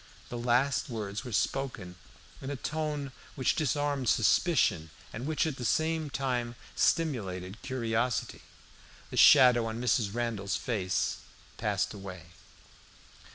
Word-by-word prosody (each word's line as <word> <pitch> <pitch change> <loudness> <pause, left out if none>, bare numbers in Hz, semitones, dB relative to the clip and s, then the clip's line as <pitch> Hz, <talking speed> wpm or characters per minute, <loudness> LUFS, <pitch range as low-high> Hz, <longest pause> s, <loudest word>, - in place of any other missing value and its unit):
The 120 - -5
last 125 +4 +1
words 105 -2 -4
were 125 - -7
spoken 110 -6 -2 0.5
in 135 - -5
a 145 - -2
tone 150 0 -3 0.2
which 130 - +1
disarmed 145 -3 0
suspicion, 100 - +3 0.2
and 120 +6 -5
which 155 0 +1
at 155 -4 -3
the 125 - -6
same 160 +4 0
time 125 -3 -2 0.2
stimulated 100 - 0
curiosity. 120 -2 -1 0.7
The - - -5
shadow 125 -5 +7
on 110 +1 -4
Mrs. 120 -4 +1
Randall's 110 -5 -2
face 95 -6 -1 0.4
passed - - -1
away. 95 -4 -9
120 Hz, 120 wpm, -30 LUFS, 105-140 Hz, 0.7 s, shadow